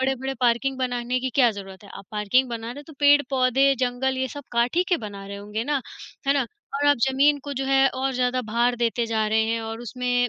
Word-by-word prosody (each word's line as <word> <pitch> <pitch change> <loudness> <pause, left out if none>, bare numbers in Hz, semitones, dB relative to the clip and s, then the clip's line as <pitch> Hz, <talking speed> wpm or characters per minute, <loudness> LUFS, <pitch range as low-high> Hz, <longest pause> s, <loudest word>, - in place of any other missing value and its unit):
बड़े-बड़े 265 0 -1
पार्किंग 250 +2 +1
बनाने 245 -1 -1
की 260 - -2
क्या 250 -4 +5
ज़रूरत 195 -1 -10
है। 200 - -14
आप 195 - -11
पार्किंग 215 +5 +1
बना 230 -1 -5
रहे 245 - -6
हैं 290 - -9
तो 315 - -12
पेड़-पौधे, 275 -2 +4
जंगल 255 +1 0
ये 260 - -1
सब 285 +2 -9
काट 235 +4 +1
ही 355 - +5
के 355 - +3
बना 200 -3 -8
रहे 200 0 -7
होंगे 210 +2 -4
ना, 290 0 0 0.5
है 275 - +4
ना? 270 -4 +1 0.3
और 290 +1 0
आप 290 - +5
ज़मीन 285 +2 +3
को 285 - -4
जो 270 +1 -2
है 270 0 +4
और 265 +1 -1
ज़्यादा 250 0 +1
भार 240 +2 +1
देते 235 0 0
जा 220 -1 0
रहे 220 +1 +2
हैं 230 0 -1
और 225 +1 -6
उसमें 245 +1 -1
250 Hz, 240 wpm, -24 LUFS, 230-270 Hz, 0.5 s, क्या